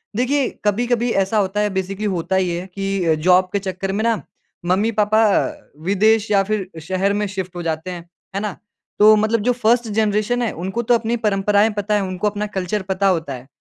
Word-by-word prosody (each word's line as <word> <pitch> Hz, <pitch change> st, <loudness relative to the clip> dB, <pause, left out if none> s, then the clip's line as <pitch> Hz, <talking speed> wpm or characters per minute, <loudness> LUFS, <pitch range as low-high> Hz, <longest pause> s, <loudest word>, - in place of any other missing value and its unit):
देखिए 255 Hz, +3 st, +1 dB, 0.2 s
कभी-कभी 240 Hz, +3 st, +1 dB
ऐसा 195 Hz, +3 st, -2 dB
होता 200 Hz, 0 st, 0 dB
है 210 Hz, 0 st, +1 dB
बेसिकली 190 Hz, +2 st, -3 dB
होता 190 Hz, -1 st, -1 dB
ये 175 Hz, -2 st, 0 dB
है 185 Hz, -, -9 dB
कि 195 Hz, -4 st, 0 dB
जॉब 185 Hz, +1 st, +4 dB
के 200 Hz, -, +1 dB
चक्कर 190 Hz, 0 st, -4 dB
में 205 Hz, +3 st, -1 dB
ना, 230 Hz, -2 st, +1 dB, 0.4 s
मम्मी-पापा 210 Hz, +3 st, +2 dB, 0.6 s
विदेश 215 Hz, +3 st, +3 dB
या 200 Hz, -1 st, +4 dB
फिर 200 Hz, -2 st, -2 dB
शहर 190 Hz, +4 st, 0 dB
में 210 Hz, 0 st, 0 dB
शिफ्ट 190 Hz, -2 st, -5 dB
हो 175 Hz, -, -5 dB
जाते 160 Hz, +2 st, -3 dB
हैं। 175 Hz, -1 st, -6 dB, 0.3 s
है -, -, 0 dB
ना? 210 Hz, -2 st, -3 dB, 0.4 s
तो 215 Hz, +1 st, +8 dB
मतलब 215 Hz, +2 st, +1 dB
जो 245 Hz, +4 st, +2 dB
फर्स्ट 235 Hz, +2 st, +3 dB
जनरेशन 215 Hz, +2 st, 0 dB
है, 235 Hz, -, 0 dB
उनको 190 Hz, +7 st, -3 dB
तो 240 Hz, -, +2 dB
अपनी 230 Hz, +1 st, -1 dB
परंपराएँ 205 Hz, +1 st, +3 dB
पता 205 Hz, +1 st, 0 dB
है, 205 Hz, -, +2 dB
उनको 185 Hz, +2 st, -2 dB
अपना 205 Hz, 0 st, -3 dB
कल्चर 190 Hz, +3 st, -1 dB
पता 190 Hz, +1 st, +1 dB
होता 165 Hz, -6 st, 0 dB
है। 130 Hz, 0 st, -9 dB
200 Hz, 200 wpm, -20 LUFS, 185-215 Hz, 0.6 s, तो